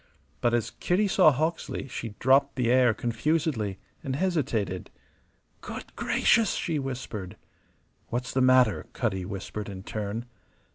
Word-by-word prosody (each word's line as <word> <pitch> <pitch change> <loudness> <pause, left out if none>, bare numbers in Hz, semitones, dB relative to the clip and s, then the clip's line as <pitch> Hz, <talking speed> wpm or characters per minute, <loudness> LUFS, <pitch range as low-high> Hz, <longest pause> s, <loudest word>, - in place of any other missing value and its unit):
But 120 0 +3
as 115 -1 -1
Kitty 195 +4 +1
saw 185 -4 +6
Hawksley 155 0 -2
she 115 -4 -6
dropped 140 +2 +4
the 125 -3 +1
air 125 -1 +5
confusedly, 120 - -1 0.3
and 130 -1 -2
hesitated. 130 - -1 0.7
"Good - - -8
gracious!" 225 -4 +3
she 160 -3 -1
whispered. 125 -8 -5 0.7
"What's 125 +2 -3
the 130 - +2
matter?" 130 -4 +4
Cutty 95 -6 -1
whispered 100 +1 -5
in 95 -1 -7
turn. 105 +3 -4
125 Hz, 130 wpm, -27 LUFS, 105-140 Hz, 0.7 s, saw